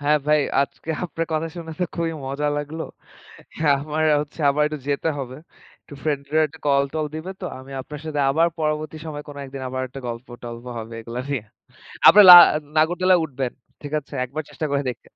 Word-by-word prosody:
হ্যাঁ 150 +1 +3
ভাই 150 0 +4 0.2
আজকে 160 +3 -7
আপনার 165 -1 -3
কথা 160 +1 -1
শুনে 165 -1 -7
তো - - +3
খুবই 165 -1 -1
মজা 140 +2 -2
লাগলো। 150 +2 -4 1.0
আমার 155 +2 -2 0.2
হচ্ছে 150 +2 -8
আবার 150 +2 +1
একটু 150 0 -4
যেতে 145 +3 0
হবে 130 -1 -6 0.5
একটু - - -13
ফ্রেন্ড-ট্রেন্ডরা 150 +1 0
কল-টল 140 +2 +1
দিবে 160 +4 -5
তো। - - -6
আমি 130 +1 -12
আপনার 150 +2 -9
সাথে 150 -2 -2
আবার 165 +4 +3
পরবর্তী 155 0 -2
সময়ে 150 -1 -6
কোনো 145 - -9
একদিন 135 0 -8
আবার 130 0 -3
একটা 135 +2 -9
গল্প-টল্প 120 0 -8
হবে 115 +1 -8
এগুলা 115 +2 -6
নিয়ে। 135 -6 -1 0.7
আপনে 210 - +9
লা - - +15 0.4
নাগরতালায় 180 +3 +3
উঠবেন 130 -4 -4 0.3
ঠিক 145 0 -7
আছে? 145 0 -11
একবার 140 +5 -5
চেষ্টা 155 - -3
করে 140 0 +1
দেখবেন। 125 - -7
150 Hz, 180 wpm, -22 LUFS, 135-155 Hz, 1.0 s, লা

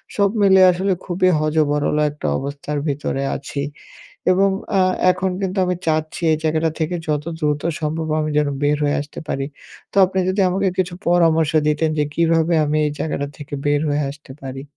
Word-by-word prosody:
সব 200 -1 +3
মিলে 190 -1 +6
আসলে 190 +2 0
খুবই 185 0 +2
হ-য-ব-র-ল 150 -1 +1
একটা 150 - -5
অবস্থার 140 +1 -4
ভেতরে 140 -1 -2
আছি। 140 0 -5 0.7
এবং 195 +2 +4 0.3
আ - - +5 0.3
এখন 185 +1 -2
কিন্তু 190 0 -2
আমি 180 0 0
চাচ্ছি 155 +1 -1
এই 155 - +1
জায়গাটা 160 +1 +1
থেকে 160 +2 -1
যত 150 -1 0 0.2
দ্রুত 150 -2 0 0.2
সম্ভব 160 +1 -2
আমি 155 - -2
যেন 150 -1 +2 0.2
বের 145 +1 +2
হয়ে 145 0 +1
আসতে 145 - -9
পারি। 135 -1 -2 0.5
তো - - -6
আপনি 190 +1 -2
যদি 190 +2 +1
আমাকে 190 +1 +1
কিছু 185 -1 0
পরামর্শ 165 -3 +3 0.2
দিতেন, 150 +1 +1
যে - - +3
কিভাবে 165 0 +2
আমি 150 +1 0
এই 150 - 0
জায়গাটা 145 -2 -2
থেকে 145 0 -10
বের 145 0 +2
হয়ে 145 +1 0
আসতে 145 -1 -14
পারি? 135 0 -6
155 Hz, 180 wpm, -20 LUFS, 145-180 Hz, 0.7 s, মিলে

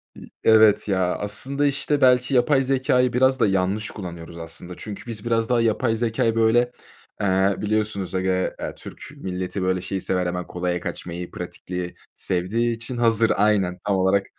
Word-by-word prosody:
İ - - -12 0.2
evet, 110 -2 +5
ya, 95 -3 +1
aslında, 135 +7 -1
işte, 145 +1 0
belki 125 +1 +4
yapay 135 +2 +3
zekâyı 130 -2 +2
biraz 130 +1 +3
da 110 - +4
yanlış 95 +2 0
kullanıyoruz 85 -4 -8
aslında. 85 +2 -6
Çünkü 105 -2 -8
biz 115 -3 -5
biraz 115 -1 0
daha 120 -1 +3
yapay 115 +1 +1
zekâyı 115 0 0
böyle, 120 +2 +3 0.5
eee, 95 0 +2
biliyorsunuz 105 -3 -1
ege 95 0 0 0.3
eee, - - -3
ya - - -6
Türk - - -10 0.2
milleti 95 +1 -4
böyle 95 0 0
şeyi 95 +1 -4
sever, 90 0 0
hemen 90 0 -3
kolaya 90 0 -2
kaçmayı, 90 0 -6
pratikliği 90 -1 -6 0.2
sevdiği 105 +7 -1
için 120 +2 -3
hazır 115 -1 +3
Aynen, 100 -3 +2
tam 100 - +2
olarak 95 +1 +2
105 Hz, 165 wpm, -23 LUFS, 90-120 Hz, 0.5 s, evet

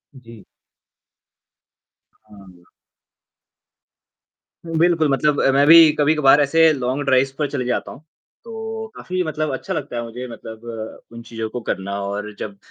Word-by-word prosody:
जी। 115 -4 -14 1.8
हाँ। 95 -4 -17 2.0
बिल्कुल 165 -1 +2
मतलब 145 +2 +1
अ, 135 - +3
मैं 140 +1 +3
भी 165 -1 +9
कभी-कभार 150 -1 +4
ऐसे 160 +3 +4
लॉन्ग 130 +1 -2
ड्राइव्स 135 0 +2
पर 145 - 0
चले 125 - -3
जाता 125 - -2
हूँ, - - -12 0.4
तो 225 -1 -6
काफ़ी 185 0 -4
मतलब 155 -2 -3
अच्छा - - -4
लगता 140 -3 -5
है 120 - -2
मुझे 125 +2 -7
मतलब 115 -1 -9
उन 115 0 -10
चीज़ों 115 -1 -5
को 120 +1 -6
करना 100 +1 -3
और 105 +2 -4
जब 100 -2 -7
135 Hz, 135 wpm, -20 LUFS, 115-155 Hz, 2.0 s, भी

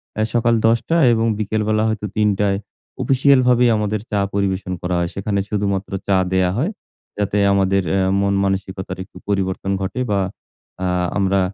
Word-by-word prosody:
অ্যা 110 - +1
সকাল 120 0 +3
১০ 115 +1 +4
টা 165 - +3 0.2
এবং 115 0 +1
বিকেলবেলা 110 0 0
হয়তো 110 -1 -3
৩ 105 -1 +3
টায় 100 -1 +2 0.4
অফিসিয়ালভাবেই 130 -2 +4
আমাদের 105 0 -1
চা 105 - +1
পরিবেশন 95 -2 -1
করা 90 0 -1
হয়। 85 0 -1
সেখানে 100 +1 -1
শুধুমাত্র 100 -2 -1 0.2
চা 100 -1 +3 0.2
দেওয়া 95 -1 +2
হয় 155 - 0 0.5
যাতে 105 0 -1 0.2
আমাদের 95 0 +2
অ্যা 95 -1 +2 0.2
মন 100 0 +1
মানসিকতার 95 -1 -3
একটু 95 - -16
পরিবর্তন 95 -1 -1
ঘটে 95 +7 -3
বা 100 - +2 0.7
আহ 90 0 0
আমরা 100 -1 +2
100 Hz, 160 wpm, -20 LUFS, 95-110 Hz, 0.7 s, ১০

